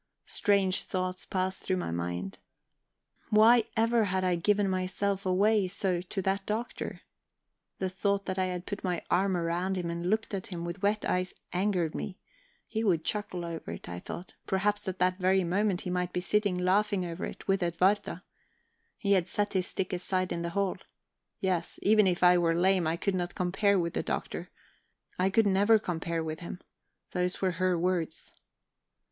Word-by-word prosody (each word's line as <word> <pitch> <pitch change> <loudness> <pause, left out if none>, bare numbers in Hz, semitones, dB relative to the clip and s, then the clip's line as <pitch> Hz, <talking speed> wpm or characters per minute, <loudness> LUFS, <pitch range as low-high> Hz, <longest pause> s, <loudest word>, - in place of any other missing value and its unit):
Strange 200 -2 +2
thoughts 185 0 -3
passed 185 0 -1
through 185 - 0
my 175 - -3
mind. 85 +2 -3 0.9
Why 220 +2 +6
ever 230 0 +3
had 190 -1 0
I 180 -1 +2
given 205 +4 +2
myself 190 +1 -1
away 200 +2 +3
so 185 -1 -1
to 190 +2 -4
that 195 +1 0
Doctor? 220 +3 -3 0.8
The 190 - -1
thought 200 +1 0
that 185 0 -2
I 185 - +2
had 180 -1 -4
put 205 0 -5
my 180 -3 -1
arm 190 +1 +3
round 175 +3 -1
him 170 -2 -2
and 170 +1 -2
looked 220 +1 0
at 190 -2 -3
him 170 -3 -5
with 175 +3 -5
wet 210 +1 +1
eyes 180 0 0 0.2
angered 180 -4 +1
me; 195 -3 -5 0.5
he 220 0 -2
would 175 -7 +2
chuckle 185 -4 -3
over 165 - -5
it, - - -9
I 90 0 -5
thought; 175 - -8
perhaps 205 +2 +1
at 185 -1 -2
that 185 +1 +1
very 190 +1 +3
moment 190 +2 +1
he 180 - -4
might 180 0 -1
be - - 0
sitting 200 +1 +1
laughing 190 +1 +2
over 170 +2 -5
it, - - -6
with 195 0 +2
Edwarda. 180 +4 +1 0.7
He 200 -3 -1
had 185 -3 +4
set 205 +1 -1
his 185 -2 +1
stick 185 0 -3
aside 185 +1 -1
in 170 - -2
the 170 - -2
hall. 200 -2 +1 0.6
Yes, 180 -3 -1
even 215 -1 +5
if 180 -1 +1
I 180 0 +7
were 165 -1 +2
lame, 180 -1 +3
I 165 +1 0
could 200 +3 0
not 175 -1 -2
compare 195 +3 +2
with 170 -2 -1
the - - 0
Doctor. - - -4 0.7
I 185 +1 +3
could 220 +3 +3
never 205 +3 +5
compare 170 -4 -2
with 155 0 -4
him 175 0 -7 0.5
those 180 0 0
were 190 -1 +1
her 185 -1 +3
words... 170 -2 -1
185 Hz, 185 wpm, -30 LUFS, 175-200 Hz, 0.9 s, I